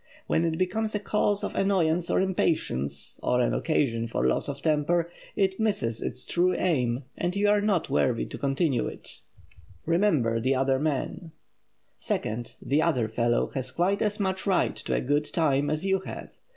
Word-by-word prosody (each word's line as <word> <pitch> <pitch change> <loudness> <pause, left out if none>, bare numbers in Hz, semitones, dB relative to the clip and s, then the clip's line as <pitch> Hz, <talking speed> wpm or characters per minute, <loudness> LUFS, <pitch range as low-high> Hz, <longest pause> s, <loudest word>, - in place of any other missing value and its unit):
When 165 - +1
it 160 -1 -1
becomes 215 +4 -1
a - - +1
cause 205 0 0
of - - -3
annoyance 175 -4 +1
or - - +2
impatience, 70 - -1
or 125 - +1
an 125 - +2
occasion 115 -8 0
for 115 - -1
loss 65 - +1
of 140 0 -5
temper, 165 +2 +1 0.2
it 190 -1 +1
misses 195 - 0
its 125 - -3
true 180 +1 +2
aim 130 -7 0
and 175 +2 -2
you 205 +1 +2
are 205 0 +4
not 200 -6 +1
worthy 125 -4 +1
to - - -8
continue 135 -2 +1
it. - - -9
[Sidenote: - - -12 0.6
REMEMBER 160 - +2
THE 130 +4 +1
OTHER 135 0 +2
MAN] 155 +3 -2 0.7
Second; 115 +3 -3
the 145 +3 +1
"other 130 -10 +1
fellow" 120 +2 +1
has 130 -1 -3
quite 185 +8 0
as 210 0 0
much 190 0 -1
right 190 -2 +2
to - - -2
a - - 0
good 145 +3 0
time 145 -3 +1
as 155 +4 -2
you 190 0 +2
have. 190 - -8
160 Hz, 180 wpm, -27 LUFS, 130-190 Hz, 0.7 s, are